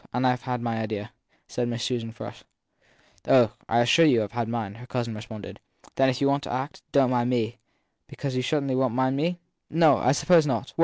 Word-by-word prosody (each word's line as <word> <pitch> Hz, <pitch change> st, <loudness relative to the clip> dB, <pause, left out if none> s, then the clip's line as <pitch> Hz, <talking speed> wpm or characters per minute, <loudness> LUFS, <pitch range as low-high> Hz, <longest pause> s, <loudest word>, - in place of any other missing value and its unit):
And 125 Hz, +1 st, 0 dB
I 125 Hz, -1 st, +4 dB
ve 125 Hz, 0 st, -4 dB
my 115 Hz, -1 st, -1 dB
idea/ 110 Hz, 0 st, -4 dB, 0.4 s
said 120 Hz, -1 st, -2 dB
Susan 120 Hz, -2 st, -2 dB
Frush. -, -, -9 dB, 0.9 s
Oh, 120 Hz, -4 st, +5 dB, 0.2 s
I 120 Hz, +1 st, +4 dB
assure 120 Hz, +8 st, +5 dB
you 125 Hz, -8 st, +4 dB
I 115 Hz, +3 st, -3 dB
ve -, -, -7 dB
mine! 115 Hz, -4 st, -3 dB
her 125 Hz, -, -11 dB
cousin 120 Hz, -3 st, -3 dB
responded. 110 Hz, -1 st, -9 dB, 0.3 s
Then 135 Hz, 0 st, +3 dB
if 130 Hz, -, -1 dB
you 140 Hz, -, +4 dB
want 140 Hz, +1 st, +2 dB
to -, -, -5 dB
act, 130 Hz, +4 st, -4 dB
don 135 Hz, -3 st, +4 dB
t -, -, -2 dB
mind 120 Hz, -1 st, +1 dB
me/ 120 Hz, -3 st, +2 dB
1 115 Hz, -, -9 dB, 0.5 s
Because 135 Hz, -2 st, -5 dB
you 130 Hz, -, +1 dB
certainly 140 Hz, 0 st, 0 dB
won 130 Hz, -2 st, +1 dB
t 130 Hz, 0 st, +2 dB
me? 170 Hz, +5 st, -1 dB, 0.3 s
No, 160 Hz, -3 st, +5 dB
I 130 Hz, -, +2 dB
suppose 160 Hz, +2 st, +4 dB
not. 135 Hz, 0 st, -2 dB
125 Hz, 215 wpm, -26 LUFS, 115-135 Hz, 0.9 s, Oh